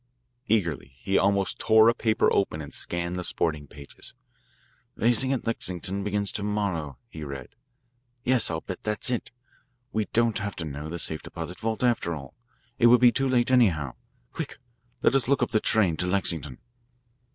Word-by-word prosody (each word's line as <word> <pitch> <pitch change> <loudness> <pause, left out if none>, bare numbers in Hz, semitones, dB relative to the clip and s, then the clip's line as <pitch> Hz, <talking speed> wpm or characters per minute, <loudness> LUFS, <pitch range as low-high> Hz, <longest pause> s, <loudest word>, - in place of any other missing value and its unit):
Eagerly 85 - 0
he 95 +10 -2
almost 100 0 +2
tore 110 0 +6
a 115 - +6
paper 110 -1 +2
open 85 -5 +1
and 75 -2 -8
scanned 85 +1 -2
the - - -3
sporting 75 -4 -1
pages. 70 0 -9 0.8
"Racing 120 +4 +2
at 135 - -1
Lexington 95 -3 -1
begins 100 0 -1
to - - -3
morrow," 100 -10 -2
he 80 - -9
read. 70 -3 -7 0.7
"Yes, 125 -2 +4
I'll 80 -1 -2
bet 95 - -7
that's 105 +3 -1
it. 120 - -2 0.6
We 110 -1 0
don't 115 -1 +1
have 100 -1 -4
to 80 - -4
know 75 +1 -6
the 85 - -4
safe 80 -2 -1
deposit 90 - -6
vault, 110 +1 -2
after 115 -9 +1
all. 70 -3 -9 0.5
It 120 - +6
would 120 +1 +7
be 125 -1 +7
too 135 +2 0
late, 125 -1 +2
anyhow. 85 - +3 0.4
Quick, - - -6 0.5
let - - +4
us 135 -4 +3
look 135 -2 +3
up 120 - -2
the 110 - +3
train 100 -8 +2
to 90 - -1
Lexington." 85 -8 -1
100 Hz, 175 wpm, -26 LUFS, 80-115 Hz, 0.8 s, would